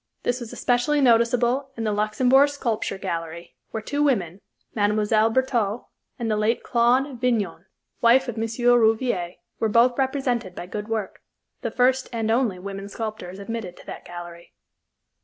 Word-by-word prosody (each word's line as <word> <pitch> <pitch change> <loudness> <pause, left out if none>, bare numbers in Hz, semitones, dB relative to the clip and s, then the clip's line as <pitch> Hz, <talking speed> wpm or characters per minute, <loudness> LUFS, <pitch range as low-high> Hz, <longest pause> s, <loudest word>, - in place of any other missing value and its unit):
This 245 +1 0
was 235 -3 -8
especially 245 +5 +1
noticeable 245 +1 +3
in 225 - -3
the 215 - 0
Luxembourg 250 +7 +3
Sculpture 235 -9 -2
Gallery, 170 -2 -5
where 220 -1 -5
two 290 +5 -2
women, 200 - 0 0.3
Mme. 205 -1 +1 0.4
Bertaux 235 -3 0 0.3
and 230 -2 -2
the - - +2
late 215 +3 0
Claude 250 +2 +2
Vignon, 235 -5 -1 0.3
wife 255 +3 +5
of 240 - -4
M. 225 - -2 0.2
Rouvier, 225 -6 +3 0.3
were 225 - +1
both 240 +4 +3
represented 255 -7 -1
by - - -6
good 210 +3 -6
work 220 -4 -4 0.4
the - - -2
first 255 +1 +2
and 225 -2 -1
only 230 -5 +1
women 195 +1 -7
sculptors 210 -4 -6
admitted 200 -3 -6
to - - -15
that - - -8
gallery. 175 -1 -10
230 Hz, 155 wpm, -24 LUFS, 205-250 Hz, 0.4 s, wife